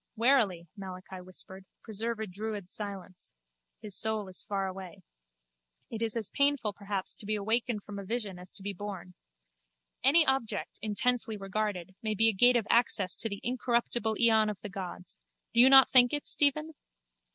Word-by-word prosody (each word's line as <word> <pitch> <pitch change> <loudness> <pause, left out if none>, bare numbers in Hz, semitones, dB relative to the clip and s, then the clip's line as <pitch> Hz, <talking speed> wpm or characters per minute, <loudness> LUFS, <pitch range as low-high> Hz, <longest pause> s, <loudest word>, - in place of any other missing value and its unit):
Warily, 220 -8 +2
Malachi 185 -1 -9
whispered, 185 +1 -8 0.2
preserve 225 +1 -4
a 220 - -3
druid 205 -1 -6
silence. 195 - -6 0.5
His 205 -3 -4
soul 220 -2 -1
is 185 - -5
far 195 -1 -3
away. 185 -2 -8 0.9
It 225 - -6
is 230 0 +2
as 220 -4 -1
painful 280 -7 +1
perhaps 200 -1 -4
to - - -8
be 215 - 0
awakened 220 +1 -1
from 205 -1 -8
a - - -7
vision 205 -3 -4
as 180 0 -10
to 195 - -4
be 200 0 -4
born. 190 -2 -8 0.9
Any 305 +5 +6
object, 265 -5 -1
intensely 220 +1 0
regarded, 195 -2 -4
may 215 -1 -2
be 225 +2 +5
a - - 0
gate 245 +6 +5
of 230 -3 +1
access 220 -6 +2
to 225 - -1
the 200 -1 -7
incorruptible 240 -2 0
eon 220 -2 +4
of 210 - -5
the 210 - -7
gods. 185 -2 -8 0.3
Do 235 - +3
you 255 +2 +9
not 270 0 +9
think 245 0 +7
it, 290 - -2
Stephen? 305 +2 +1
215 Hz, 175 wpm, -29 LUFS, 195-235 Hz, 0.9 s, you